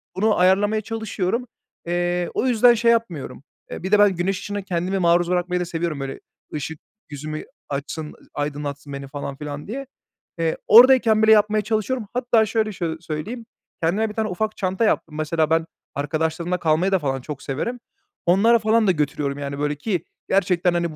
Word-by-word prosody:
bunu 210 Hz, +3 st, +2 dB
ayarlamaya 205 Hz, +4 st, +3 dB
çalışıyorum. 220 Hz, +1 st, -2 dB, 0.4 s
Eee, 175 Hz, 0 st, 0 dB
o 260 Hz, -, 0 dB
yüzden 245 Hz, 0 st, +6 dB
şey 235 Hz, 0 st, +3 dB
yapmıyorum. 185 Hz, -12 st, -2 dB, 0.3 s
Eee, -, -, -6 dB
bir 190 Hz, -, -3 dB
de 210 Hz, -, +5 dB
ben 205 Hz, -2 st, +5 dB
güneş 185 Hz, +3 st, -1 dB
ışığına 205 Hz, 0 st, -4 dB
kendimi 185 Hz, +1 st, -2 dB
maruz 175 Hz, 0 st, +3 dB
bırakmayı 180 Hz, 0 st, 0 dB
da -, -, -1 dB
seviyorum, 165 Hz, -3 st, -3 dB
böyle, 135 Hz, 0 st, -5 dB, 0.3 s
ışık 150 Hz, +1 st, -5 dB, 0.3 s
yüzümü 155 Hz, +1 st, -6 dB, 0.3 s
açsın, 145 Hz, +2 st, -5 dB, 0.2 s
aydınlatsın 145 Hz, -1 st, -4 dB
beni, 140 Hz, 0 st, -6 dB
falan 140 Hz, 0 st, -6 dB
filan 150 Hz, 0 st, -6 dB
diye. 270 Hz, +5 st, -5 dB, 0.5 s
Eee, 165 Hz, -1 st, 0 dB
oradayken 230 Hz, -2 st, +7 dB
bile 220 Hz, -, +6 dB
yapmaya 215 Hz, 0 st, +4 dB
çalışıyorum. 220 Hz, +2 st, -1 dB
Hatta 240 Hz, -3 st, +3 dB
şöyle 215 Hz, 0 st, 0 dB
şöy 170 Hz, -4 st, -3 dB
söyleyeyim, 170 Hz, +9 st, -5 dB, 0.4 s
kendime 200 Hz, +7 st, +1 dB
1 -, -, -7 dB
tane 220 Hz, 0 st, -1 dB
ufak 215 Hz, +4 st, -2 dB
çanta 190 Hz, +3 st, 0 dB
yaptım. 160 Hz, -7 st, 0 dB
Mesela 155 Hz, 0 st, 0 dB
ben 165 Hz, 0 st, +2 dB, 0.3 s
arkadaşlarımla 160 Hz, +4 st, -1 dB
kalmayı 165 Hz, +3 st, +1 dB
da 190 Hz, -, +3 dB
falan 135 Hz, -3 st, -2 dB
çok 145 Hz, +1 st, -7 dB
severim. 235 Hz, -, -3 dB, 0.5 s
Onlara 215 Hz, +7 st, +5 dB
falan 220 Hz, 0 st, +2 dB
da -, -, +6 dB
götürüyorum, 145 Hz, -3 st, -1 dB
yani, 140 Hz, 0 st, -5 dB
böyle, 145 Hz, 0 st, 0 dB
ki 175 Hz, +2 st, -2 dB, 0.2 s
gerçekten, 180 Hz, -2 st, +2 dB
hani, 170 Hz, -2 st, -1 dB
180 Hz, 170 wpm, -22 LUFS, 155-215 Hz, 0.5 s, oradayken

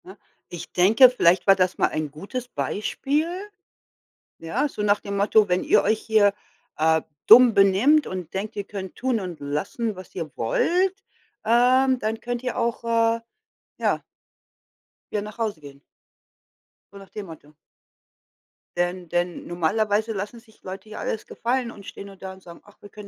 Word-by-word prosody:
Na. 190 Hz, +3 st, -12 dB, 0.3 s
Ich 175 Hz, -, -8 dB
denke, 220 Hz, +8 st, +7 dB
vielleicht 185 Hz, -7 st, +2 dB
war 195 Hz, -, +8 dB
das 185 Hz, -1 st, 0 dB
mal -, -, +3 dB
ein 155 Hz, -2 st, -3 dB
gutes 205 Hz, -, -6 dB
Beispiel, 275 Hz, +7 st, -2 dB, 1.1 s
ja, 225 Hz, -, -1 dB
so 240 Hz, -, -7 dB
nach 205 Hz, 0 st, +3 dB
dem 200 Hz, 0 st, -5 dB
Motto: 205 Hz, +1 st, +4 dB
„Wenn 180 Hz, +1 st, +1 dB
ihr -, -, +4 dB
euch 215 Hz, +1 st, +1 dB
hier, 210 Hz, -2 st, +3 dB, 0.4 s
äh, 160 Hz, +1 st, +3 dB, 0.3 s
dumm 240 Hz, +1 st, +9 dB
benimmt 205 Hz, +10 st, +4 dB
und 180 Hz, -3 st, -6 dB
denkt, 205 Hz, +3 st, -4 dB
ihr 205 Hz, -, -3 dB
könnt 190 Hz, -3 st, -7 dB
tun 255 Hz, -3 st, -1 dB
und 180 Hz, -5 st, -6 dB
lassen, 170 Hz, +10 st, -3 dB
was 185 Hz, 0 st, -12 dB
ihr 165 Hz, -4 st, -4 dB
wollt, 355 Hz, -, +1 dB, 0.5 s
ähm, 255 Hz, +3 st, +4 dB
dann 220 Hz, 0 st, -2 dB
könnt 245 Hz, +1 st, -4 dB
ihr 250 Hz, -, -3 dB
auch“, 235 Hz, 0 st, -1 dB
äh, 230 Hz, 0 st, +1 dB, 0.6 s
ja -, -, 0 dB, 1.1 s
„wieder 210 Hz, -, -1 dB
nach 210 Hz, +1 st, -9 dB
Hause 220 Hz, -7 st, -2 dB
gehen“ 140 Hz, -1 st, -13 dB, 1.1 s
so 200 Hz, -, -12 dB
nach 195 Hz, -1 st, -13 dB
dem 210 Hz, -2 st, -7 dB
Motto. 155 Hz, -3 st, -13 dB, 1.2 s
Denn 175 Hz, 0 st, -2 dB
denn 175 Hz, +1 st, -2 dB
normalerweise 210 Hz, +6 st, 0 dB
lassen 205 Hz, +4 st, -5 dB
sich 225 Hz, -1 st, -24 dB
Leute 190 Hz, +3 st, -8 dB
hier 215 Hz, -, -8 dB
alles 220 Hz, -, -3 dB
gefallen 240 Hz, 0 st, -2 dB
und 200 Hz, -4 st, -13 dB
stehen 200 Hz, -, -9 dB
nur 195 Hz, -, -12 dB
da 190 Hz, 0 st, -8 dB
und 190 Hz, -, -16 dB
sagen: 170 Hz, -2 st, -13 dB
„Ach, 205 Hz, -, -20 dB
wir 205 Hz, -, -12 dB
können 210 Hz, 0 st, -11 dB
205 Hz, 170 wpm, -24 LUFS, 185-230 Hz, 1.2 s, dumm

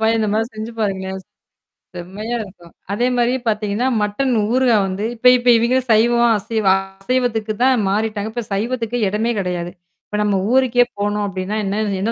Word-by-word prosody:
பாயா 220 Hz, +1 st, +2 dB
இந்த 215 Hz, -1 st, 0 dB
மாரி 220 Hz, +1 st, +1 dB
செஞ்சு 220 Hz, +2 st, -6 dB
பாருங்க. 195 Hz, -3 st, -1 dB, 0.9 s
செம்மையா 200 Hz, +7 st, -5 dB
இருக்கும். 180 Hz, -5 st, -12 dB, 0.2 s
அதே 240 Hz, +4 st, +1 dB
மாரி 240 Hz, +1 st, +2 dB
பார்த்தீங்கன்னா, 215 Hz, +3 st, 0 dB
மட்டன் 245 Hz, +6 st, 0 dB, 0.2 s
ஊறுகாய் 245 Hz, -5 st, +3 dB
வந்து 190 Hz, +2 st, -4 dB
இப்ப 240 Hz, +2 st, +2 dB
இப்ப 245 Hz, -, -6 dB
இவிங்களே 245 Hz, +3 st, +2 dB
சைவமா 235 Hz, +2 st, +4 dB
அசைவ 220 Hz, +1 st, -3 dB, 0.4 s
அசைவத்துக்குதான் 245 Hz, -1 st, +1 dB
மாறிட்டாங்க. 215 Hz, +1 st, -1 dB
இப்ப 240 Hz, -1 st, -3 dB
சைவத்துக்கு 235 Hz, +3 st, -2 dB
இடமே 215 Hz, +4 st, 0 dB
கிடையாது. 175 Hz, -2 st, -3 dB, 0.4 s
இப்ப 210 Hz, -, -4 dB
நம்ம 205 Hz, -1 st, +1 dB, 0.2 s
ஊருக்கே 250 Hz, -2 st, +4 dB
போனோம், 205 Hz, 0 st, -1 dB
அப்பிடின்னா, 195 Hz, +2 st, -4 dB
என்ன 200 Hz, +2 st, -1 dB, 0.2 s
என்ன 225 Hz, -, 0 dB
220 Hz, 155 wpm, -19 LUFS, 205-240 Hz, 0.9 s, சைவமா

